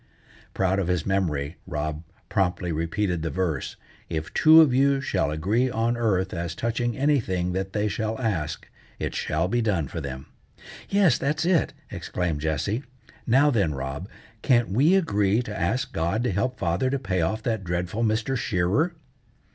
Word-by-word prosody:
Proud 95 +1 +1
of 95 - -1
his 90 -2 0
memory, 85 -6 -1
Rob 75 +1 -3 0.3
promptly 90 -2 0
repeated 85 +2 -1
the 80 - -2
verse: 85 -7 -2 0.3
"If 80 -1 -4
two 160 +1 +7
of 155 -6 +6
you 135 +1 +3
shall 95 - 0
agree 100 +12 +1
on 115 0 0
earth 95 -6 0
as 85 -1 -3
touching 115 +2 -1
anything 110 -11 +1
that 95 +1 -3
they 105 0 +1
shall 110 +2 -2
ask, 80 -10 -2 0.3
it - - -3
shall 80 +3 -1
be 120 +5 +1
done 95 -10 0
for 80 - -5
them." 65 -1 -6 0.6
"Yes, 195 -4 +4
that's 150 +4 0
it!" 175 -3 +2 0.2
exclaimed 85 -5 -3
Jessie. 80 - -1 0.5
"Now 135 +5 +5
then, 95 - +1
Rob, 70 +8 -5 0.3
can't 120 -3 +3
we 140 - +4
agree 105 - +2
to 105 -3 -6
ask 120 +11 -1
God 85 +8 0
to 125 - +1
help 100 +7 -1
father 90 +8 0
to 140 - 0
pay 95 -9 -1
off 110 +7 -1
that 110 -4 -1
dreadful 90 +5 -2
Mr. 110 +4 0
Shearer?" 120 - +1
100 Hz, 165 wpm, -25 LUFS, 85-120 Hz, 0.6 s, two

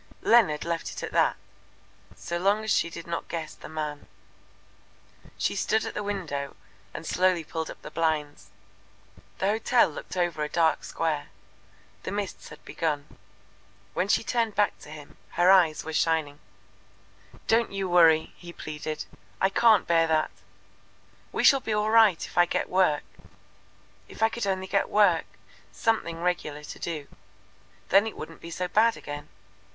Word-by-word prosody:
Leonard 200 -11 +4
left 170 -1 -2
it - - -7
at - - -4
that - - +2 0.8
so 170 0 -4
long 200 +4 +2
as 220 - -2
she 170 - +1
did 170 0 -9
not 170 0 -4
guess 165 -2 -5
the - - -12
man. 150 -2 -5 1.3
She - - -1
stood 220 0 +1
at - - -5
the - - -3
window 170 -9 -4 0.4
and - - -8
slowly 180 0 +2
pulled 160 +1 -4
up - - -9
the - - -8
blinds. 150 - -2 0.9
The - - -2
hotel 225 +4 +3
looked 160 - -8
over 175 -3 0
a 150 - -3
dark 165 -1 +2
square. 155 -3 -2 0.7
The - - -5
mists 200 -1 -5
had 150 - -14
begun. 150 -3 -3 0.8
When 185 - 0
she 205 - +2
turned 230 -2 -1
back 205 0 +1
to - - -13
him 150 -1 -11 0.2
her 180 +2 +5
eyes 175 -5 +4
were 160 - -6
shining. 155 -3 0 1.1
"Don't 230 +1 +2
you 195 -1 -2
worry," 165 -3 +4
he 175 -1 -10
pleaded. 155 -1 -6 0.3
"I 190 - +3
can't 220 -1 +5
bear 165 -1 +3
that. 155 -1 +1 1.0
We - - -1
shall 275 - +7
be 225 -4 -3
all 210 +1 +1
right 220 -6 +5
if - - -3
I 175 - +6
get - - -1
work. 180 -6 +2 1.0
If - - -5
I 225 - +5
could 235 -3 -3
only 190 -1 -1
get 195 +1 0
work 195 -6 +4 0.5
something 170 -8 -1
regular 150 -4 -2
to - - -9
do. 155 -4 -4 0.8
Then 200 +3 +5
it 220 - -7
wouldn't 165 +1 -9
be 170 - -8
so 180 +2 -3
bad 225 +4 +3
again. 145 0 -8
170 Hz, 165 wpm, -27 LUFS, 155-200 Hz, 1.3 s, shall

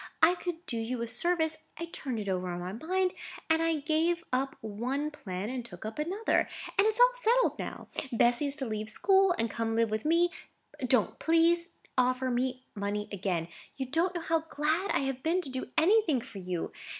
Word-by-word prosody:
I 355 - +8
could 350 -1 -5
do 235 - -2
you 230 +1 -2
a - - -3
service, 320 +3 0 0.2
I 335 - -3
turned 270 -7 -4
it 210 -2 -4
over 185 -1 -1
in 175 - -4
my 180 +2 -5
mind, 365 - 0 0.4
and 320 0 +4
I 330 -2 +1
gave 330 +3 +1
up 270 +1 0
one 250 +8 -2
plan 190 -8 -5
and 255 -2 -3
took 190 -4 -10
up 220 +6 -5
another, 375 +9 +1 0.3
and 405 - +6
it's 440 +2 0
all - - +7
settled - - +2
now. - - -6 0.2
Bessy 240 +4 +3
is 280 - -1
to 280 -3 -3
leave 215 -1 -3
school 385 - +4
and 230 - +1
come 230 +1 -2
and 225 - -1
live 230 -1 +2
with 215 0 -1
me. 340 +3 +3 0.6
Don't, 245 -4 +2
please, 335 +1 +3 0.3
offer 255 +1 +2
me 255 +1 -1
money 210 0 -3
again. 180 -4 -1 0.3
You 265 - -3
don't 340 +4 +1
know 345 - -2
how 325 0 0
glad 310 +7 0
I - - +2
have 270 -1 -2
been 335 +5 +2
to 275 - -5
do 260 0 -4
anything 355 - +4
for 225 -4 -9
you. 180 -2 -3
275 Hz, 205 wpm, -30 LUFS, 225-340 Hz, 0.6 s, I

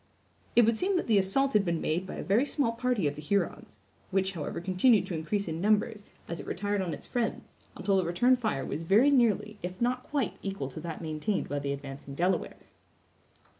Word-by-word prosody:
It 240 - +7
would 230 0 +3
seem 375 - +1
that - - -1
the 215 -3 +4
assault 270 +9 +1
had 210 - +4
been 170 -3 0
made 175 +4 -1
by - - -6
a - - -5
very 205 +7 +3
small 285 -4 0
party 230 -7 0
of 145 - -1
the 150 - -9
Hurons, 170 - -2 0.3
which, 190 0 +1
however, 160 -6 -4
continued 185 +4 +3
to 190 - -5
increase 175 +5 -2
in 160 0 -3
numbers, 210 +1 +1 0.2
as 170 - -5
it - - -8
retired 205 +2 -1
on 180 -3 -2
its 150 - -7
friends, 240 -2 -3 0.2
until 195 -1 +1
the 190 - +2
return 175 +10 +3
fire 215 - -2
was 155 - -4
very 210 +12 +5
nearly, 215 -5 +2
if 180 +1 -6
not 250 +1 +1
quite, 275 -2 -2
equal 195 -9 -4
to 150 - -8
that 165 +1 -6
maintained 160 +6 -2
by 145 - -2
the 140 0 -2
advancing 140 0 -7
Delawares. 180 +5 -2
195 Hz, 210 wpm, -29 LUFS, 165-230 Hz, 0.3 s, It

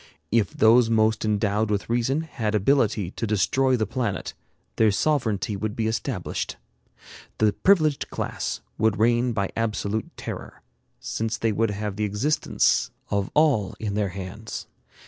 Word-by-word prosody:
If 110 -2 +3
those 115 +1 +5
most 110 -1 +2
endowed 105 0 +1
with 100 -1 -1
reason 120 +5 +1
had 115 -9 -3
ability 105 -4 +2
to 115 - -3
destroy 130 +6 +2
the 110 - 0
planet, 110 -8 -3 0.4
their 110 - +5
sovereignty 110 -4 0
would 105 +1 -3
be 115 - -1
established. 110 0 -3 0.8
The 110 -1 +3
privileged 155 - +2
class - - -3 0.2
would 110 -1 +2
reign 120 +2 +3
by 100 -4 -1
absolute 110 -1 -1
terror, - - -7 0.4
since 115 +1 -3
they 115 -1 +1
would 110 +2 +1
have 105 -1 -4
the 105 - -1
existence 105 +10 +1 0.2
of 100 -1 0
all 145 -11 +3
in 105 -2 -3
their 105 -1 0
hands. 95 +4 -7
110 Hz, 145 wpm, -25 LUFS, 105-120 Hz, 0.8 s, those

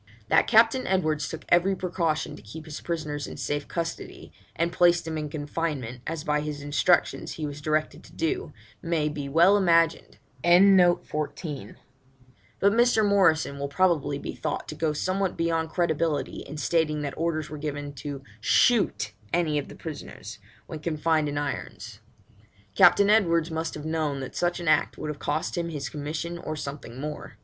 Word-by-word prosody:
That - - +4
Captain 230 +3 +4
Edwards 155 -5 0
took 160 - -7
every 180 +3 +4
precaution 170 -4 -1
to - - -13
keep 115 +10 -10
his 155 -2 -7
prisoners 155 -4 -3
in - - -8
safe 145 0 -3
custody, 170 -1 -5 0.2
and 170 +1 0
place 175 -1 +5
them 160 -1 -5
in 150 -1 -3
confinement, 145 -5 -4
as 160 -1 -3
by 150 0 +1
his 150 -1 -5
instructions 145 +4 +1
he 155 - -4
was 145 0 -6
directed 155 0 -1
to - - -16
do, 370 +4 -2 0.3
may 165 -3 0
be 145 -2 -5
well 170 +7 +5
imagined, 165 -4 +2 0.3
but 175 0 +7 2.2
Mr. 235 -2 +4
Morrison 160 -8 +3
will 140 - -2
probably 145 -2 +1
be - - -6
thought - - -4
to - - -4
go 155 0 0
somewhat 185 +4 -1
beyond 165 -1 0
credibility 160 -3 -1
in 150 - -7
stating 155 -1 0
that 140 - -3
orders 155 -2 -2
were 150 - -6
given 145 -1 -4
'to 140 0 -7 0.2
shoot 110 - +2 0.2
any 160 -4 +1
of 140 - -6
the - - -11
prisoners,' 155 -3 -8 0.3
when 155 - -7
confined 155 -1 0
in 145 - -4
irons. 115 -6 -5 0.7
Captain 200 - +6
Edwards 170 -6 +3
must 160 0 -3
have 150 0 -7
known 155 -3 -1
that 135 - -7
such 175 0 0
an 170 - -6
act 155 - +2
would 150 - -4
have 145 - -9
cost 150 +2 -2
him 170 -1 -2
his 145 -4 -4
commission 155 +3 -4
or 155 -2 -5
something 140 -4 -7
more. 150 +1 -6
155 Hz, 170 wpm, -26 LUFS, 145-170 Hz, 2.2 s, but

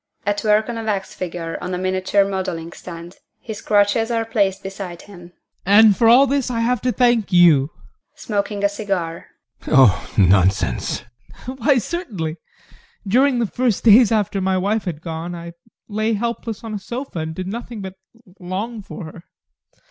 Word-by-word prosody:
ADOLPH. 205 0 +1
[At - - -7
work 215 +2 +3
on 235 - -4
a - - -5
wax 200 -3 -2
figure 170 -2 -5
on 180 0 -3
a - - -3
miniature 185 +2 +1
modelling 180 -4 -4
stand; 170 0 -10 0.2
his 220 -2 -8
crutches 205 +2 +2
are 230 -1 0
placed 200 -4 0
beside 190 -3 -7
him] 175 -3 -14 0.3
and 205 +2 +6
for 230 +1 +4
all 255 +4 +7
this 275 -1 0
I 230 -2 -1
have 240 0 0
to 250 - +1
thank 240 -5 +2
you! 165 -6 +5 0.5
GUSTAV. - - -26
[Smoking 205 -1 -2
a 200 - +4
cigar] 195 -5 -4 0.4
Oh, 130 -8 +4
nonsense! 95 -1 +2 0.4
ADOLPH. 260 +2 -7
Why, 265 +3 +3
certainly! 205 - -4 0.7
During 255 +5 +3
the 235 - +1
first 240 0 -1
days 230 0 +7
after 205 -3 0
my 190 0 +1
wife 205 +4 -1
had 165 -4 -5
gone, 165 +1 -5
I 170 0 -8 0.3
lay 215 +1 -1
helpless 230 0 -4
on 225 -1 -6
a 210 - -3
sofa 240 -1 -6
and 160 0 -4
did 185 - -5
nothing 230 +1 -6
but 190 -1 -7 0.5
long 200 +5 -5
for 200 0 -9
her. 160 +2 -11
200 Hz, 175 wpm, -20 LUFS, 175-225 Hz, 0.7 s, all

